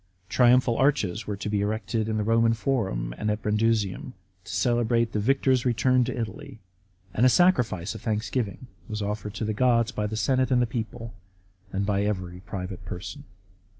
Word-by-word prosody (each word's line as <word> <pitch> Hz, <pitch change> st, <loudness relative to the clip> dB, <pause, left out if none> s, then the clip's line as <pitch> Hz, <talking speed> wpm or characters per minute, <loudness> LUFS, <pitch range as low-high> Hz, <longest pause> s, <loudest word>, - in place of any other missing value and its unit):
Triumphal 125 Hz, -1 st, +4 dB
arches 110 Hz, -8 st, +1 dB
were 105 Hz, -1 st, -3 dB
to 105 Hz, -, -5 dB
be 105 Hz, -1 st, 0 dB
erected 110 Hz, +1 st, -1 dB
in 110 Hz, -, -1 dB
the 105 Hz, -, 0 dB
Eoman 115 Hz, +1 st, +3 dB
Forum 100 Hz, -, -1 dB
and 105 Hz, -, -1 dB
at 105 Hz, +1 st, -2 dB
Brundusium, 105 Hz, +1 st, 0 dB, 0.3 s
to -, -, -8 dB
celebrate 120 Hz, -1 st, +1 dB
the 105 Hz, -, -1 dB
victor's 130 Hz, +2 st, +2 dB
return 125 Hz, +1 st, +3 dB
to 125 Hz, 0 st, -4 dB
Italy; 110 Hz, 0 st, -6 dB, 0.5 s
and 115 Hz, -, +1 dB
a 130 Hz, -, +7 dB
sacrifice 120 Hz, -, +2 dB
of 110 Hz, -, -9 dB
thanksgiving 110 Hz, 0 st, -2 dB, 0.2 s
was 105 Hz, -1 st, -3 dB
offered 105 Hz, +1 st, -4 dB
to 110 Hz, -, -2 dB
the 110 Hz, -, -1 dB
gods 115 Hz, 0 st, +2 dB
by 105 Hz, -3 st, -2 dB
the 110 Hz, +1 st, -4 dB
senate 130 Hz, +1 st, +1 dB
and 125 Hz, -2 st, +3 dB
people, 115 Hz, 0 st, -5 dB, 0.6 s
and 100 Hz, +1 st, -1 dB
by 100 Hz, -1 st, +1 dB
every 95 Hz, -4 st, -2 dB
private 95 Hz, 0 st, -6 dB
person. 140 Hz, +11 st, -7 dB
110 Hz, 175 wpm, -26 LUFS, 105-125 Hz, 0.6 s, a